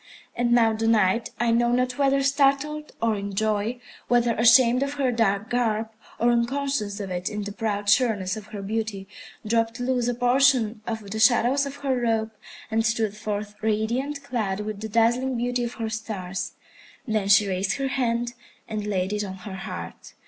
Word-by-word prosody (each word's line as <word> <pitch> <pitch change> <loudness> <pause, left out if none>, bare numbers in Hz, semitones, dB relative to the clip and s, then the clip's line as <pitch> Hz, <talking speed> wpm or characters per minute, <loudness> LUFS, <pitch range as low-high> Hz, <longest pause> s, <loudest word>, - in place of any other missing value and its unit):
And 240 0 0
now 230 -2 +4
the 225 +1 -1
Night, 220 0 +2
I 240 -1 +2
know 240 +1 +3
not 250 +1 0
whether 275 0 +3
startled 280 +2 +1
or 225 -1 +2
in 200 -1 -5
joy, 215 +3 0 0.3
whether 240 -1 +3
ashamed 240 +2 +5
of 280 +1 -1
her 275 -3 0
dark 215 -3 +1
garb, 225 -2 0 0.3
or 240 +1 +3
unconscious 235 -3 -1
of 195 -2 -5
it 180 0 -2
in 210 0 -4
the 205 - -5
proud 205 -1 -3
sureness 205 -4 +2
of 215 -1 -9
her 210 -2 -7
beauty, 210 -2 -3 0.4
dropped 230 +2 0
loose 245 -1 0
a 245 - 0
portion 245 -3 +3
of 220 -3 -5
the 220 - -3
shadows 250 +4 +4
of 280 - -7
her 265 -1 +2
robe, 225 -2 0 0.4
and 225 0 +2
stood 225 -2 0
forth 210 -1 -4
radiant, 235 +7 -1
clad 215 -7 -2
with 210 -1 -5
the 220 - -4
dazzling 240 +4 +2
beauty 245 +1 -1
of 235 - -4
her 225 - -3
stars. 195 -4 -4 0.5
Then 215 -3 0
she 205 0 +5
raised 190 0 0
her 275 -1 -2
hand 240 -2 -1 0.3
and 215 -1 -4
laid 190 -1 -1
it 210 0 -1
on 190 -2 -6
her 200 - -6
heart. 85 - -8
225 Hz, 185 wpm, -25 LUFS, 210-245 Hz, 0.5 s, ashamed